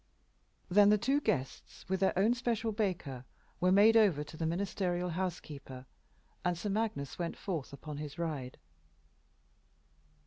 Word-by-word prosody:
Then 205 +2 +6
the 210 - +5
two 270 +7 +1
guests, 130 - -3
with 190 +1 0
their 190 -1 +2
own 210 +5 +4
special 235 -2 -1
Baker, 180 - -2 0.4
were 180 +1 +3
made 210 +4 +6
over 195 -10 +4
to 150 - -11
the 160 0 -2
ministerial 180 0 -1
house 180 0 -2
keeper, 135 -3 -10 0.6
and 180 -1 0
Sir 205 +5 -3
Magnus 200 -11 -2
went 170 -1 -3
forth 165 -9 -4
upon 145 +2 -8
his 150 +1 -6
ride. 150 -7 -4
180 Hz, 145 wpm, -32 LUFS, 150-205 Hz, 0.6 s, Then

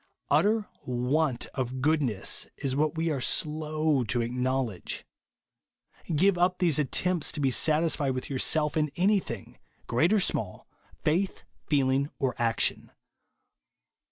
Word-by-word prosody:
Utter 210 +1 +3 0.2
want 125 +2 0
of 130 -1 -3
goodness 135 -8 +1
is 135 -2 -2
Avhat 155 +3 +1
we 165 0 0
are 140 -3 -2
slow 155 -1 0
to 120 +2 0
acknowledge. 125 -3 -2 1.1
Give 185 +3 +3
up 180 +1 +2
these 165 -5 +2
attempts 175 +4 0
to - - -5
be 135 -2 +2
satisfied 150 -2 +2
with 130 - -4
yourself 150 +3 +1
in 155 -1 +1
anything, 185 - -1 0.3
great 125 +10 +2
or 215 - +4
small, 105 - -2 0.4
faith, 180 +6 0 0.3
feeling, 140 -1 +2
or 135 -3 0
action. 115 -1 0
145 Hz, 125 wpm, -28 LUFS, 130-160 Hz, 1.1 s, or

